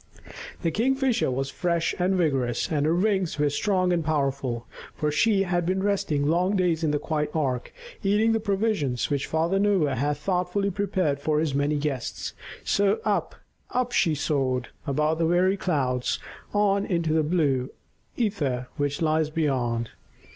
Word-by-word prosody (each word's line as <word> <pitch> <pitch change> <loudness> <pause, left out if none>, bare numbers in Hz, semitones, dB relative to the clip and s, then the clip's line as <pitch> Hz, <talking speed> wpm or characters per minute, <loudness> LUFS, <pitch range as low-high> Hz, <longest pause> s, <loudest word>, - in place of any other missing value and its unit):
The 165 - +1
Kingfisher 255 - +1
was 135 +1 -2
fresh 170 -2 0
and 185 +2 +2
vigorous, 135 -9 0
and 150 -1 +1
her 165 - +2
wings 190 -3 +1
were 145 -1 +2
strong 185 +3 +1
and 170 -2 0
powerful, 135 -6 -1 0.3
for 150 -1 -1
she 195 +7 +3
had 175 -2 0
been 190 +3 0
resting 175 -8 0
long 180 +6 +2
days 175 -3 +1
in 155 - +2
the 150 - +1
quiet 150 0 -2
ark, 130 -6 -1 0.3
eating 210 +3 +3
the 225 - +2
provisions 195 - 0
which 140 -1 0
Father 165 +5 +1
Noah 195 -9 +2
had 145 +3 0
thoughtfully 180 +4 0
prepared 185 -7 0
for 150 +1 +1
his 155 -3 0
many 145 +2 +1
guests. 145 -4 -3 0.3
So 200 +1 +2
up, - - 0 0.3
up 250 -1 -1
she 165 -9 +2
soared, 130 -4 -1 0.2
above 150 +3 +1
the 165 - +2
very 180 +3 +3
clouds, 130 -10 0 0.3
on 200 -1 +2
into 170 -5 0
the 160 - +3
blue 145 -5 +1 0.5
ether 145 - -1
which 145 +2 -1
lies 155 -1 +2
beyond. 125 -8 -1
160 Hz, 160 wpm, -26 LUFS, 145-190 Hz, 0.5 s, she